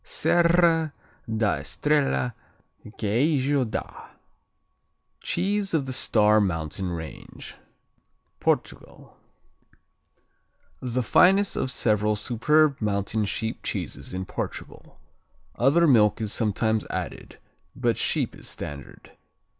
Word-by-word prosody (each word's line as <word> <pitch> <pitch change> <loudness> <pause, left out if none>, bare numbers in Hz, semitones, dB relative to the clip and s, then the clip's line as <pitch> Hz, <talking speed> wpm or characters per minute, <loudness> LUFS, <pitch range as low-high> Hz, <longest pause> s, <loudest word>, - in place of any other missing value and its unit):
Serra 170 - +2 0.4
da 110 -2 +1
Estrella, 145 -5 0 0.6
Queijo 135 +5 +1
da 110 - -6 1.1
(Cheese 195 +1 -1
of 145 -4 0
the 130 - -4
Star 110 -4 +3
Mountain 85 -1 -2
Range) 80 -2 -8 0.8
Portugal - - -3 1.7
The 125 0 -2
finest 195 - +4
of 130 - -1
several 105 -3 +1
superb 140 +7 +2
mountain 105 +1 -1
sheep 110 +3 -4
cheeses - - -5
in 95 0 -4
Portugal. - - -7 0.6
Other 145 +8 +4
milk 110 -8 +4
is 110 -2 -3
sometimes 110 0 0
added, 90 -5 -6 0.4
but - - +1
sheep - - -1
is - - -10
standard. 70 -2 -8
120 Hz, 95 wpm, -25 LUFS, 105-150 Hz, 1.7 s, finest